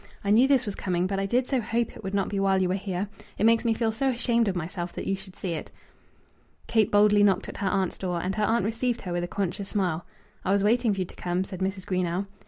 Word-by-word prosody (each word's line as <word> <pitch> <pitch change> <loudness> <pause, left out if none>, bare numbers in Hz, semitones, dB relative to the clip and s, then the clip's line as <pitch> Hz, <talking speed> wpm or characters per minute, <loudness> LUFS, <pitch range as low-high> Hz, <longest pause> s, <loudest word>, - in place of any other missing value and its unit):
I 200 - +1
knew 235 +5 +6
this 270 -3 +3
was 205 - -2
coming, 180 -2 -1
but 195 +1 -1
I 195 - 0
did 245 +4 +2
so 265 -3 +1
hope 230 +1 -1
it - - -11
would 195 +1 -3
not 195 -2 +1
be 200 - -2
while 195 -1 +3
you 185 -1 +1
were - - +1
here. 190 0 -2 0.3
It - - +2
makes 230 +1 +5
me 230 -2 +2
feel 225 -1 +1
so 265 +5 0
ashamed 235 -2 +1
of 190 - 0
myself 175 +1 -4
that - - -5
you 195 - 0
should 190 -1 -12
see 185 - -4
it." 160 - -6 0.9
Kate 220 -3 +2
boldly 205 0 +5
knocked 195 -2 +3
at - - -8
her 195 - 0
aunt's 190 -2 -1
door, 180 -2 -2
and 185 +3 -2
her 215 - -1
aunt 225 -2 +2
received 235 +2 -1
her 180 -2 -4
with 175 0 -1
a - - -2
conscious 195 +1 -3
smile. 180 -5 -1 0.4
"I 190 - 0
was 200 -1 +2
waiting 230 +2 +3
for 190 - -2
you - - 0
to - - -14
come," 180 +1 -1
said 190 -1 -8
Mrs. 190 0 -2
Greenow. 185 0 -1
195 Hz, 275 wpm, -27 LUFS, 185-220 Hz, 0.9 s, knew